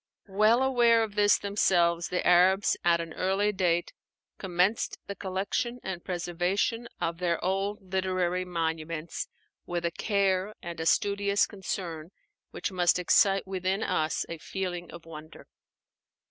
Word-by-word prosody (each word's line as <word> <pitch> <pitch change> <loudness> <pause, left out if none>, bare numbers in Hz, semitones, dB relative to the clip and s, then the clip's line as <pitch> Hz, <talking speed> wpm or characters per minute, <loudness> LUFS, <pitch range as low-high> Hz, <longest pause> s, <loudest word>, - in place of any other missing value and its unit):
Well 215 +5 +3
aware 240 -3 +4
of 215 -2 -5
this 205 0 +4
themselves, 175 -4 +2
the 180 - -2
Arabs 185 +3 +4
at 170 -1 +4
an 165 -1 -5
early 195 +3 +1
date 175 -3 0 0.5
commenced 185 +3 0
the 200 - -6
collection 200 +6 -2
and 185 -2 -5
preservation 185 +6 -1
of 165 0 -2
their 170 -2 +1
old 195 0 -2
literary 185 -1 0
monuments 165 -2 -3 0.4
with 175 -1 -2
a 170 - 0
care 200 +1 0
and 170 -1 -7
a 160 - -1
studious 200 +1 +2
concern 175 -5 -5 0.4
which - - -4
must 180 -2 +3
excite 195 +2 +3
within 190 +1 -1
us 155 0 0
a 165 - -7
feeling 175 -1 -4
of 170 -1 -11
wonder. 155 0 -11
185 Hz, 135 wpm, -28 LUFS, 170-200 Hz, 0.5 s, aware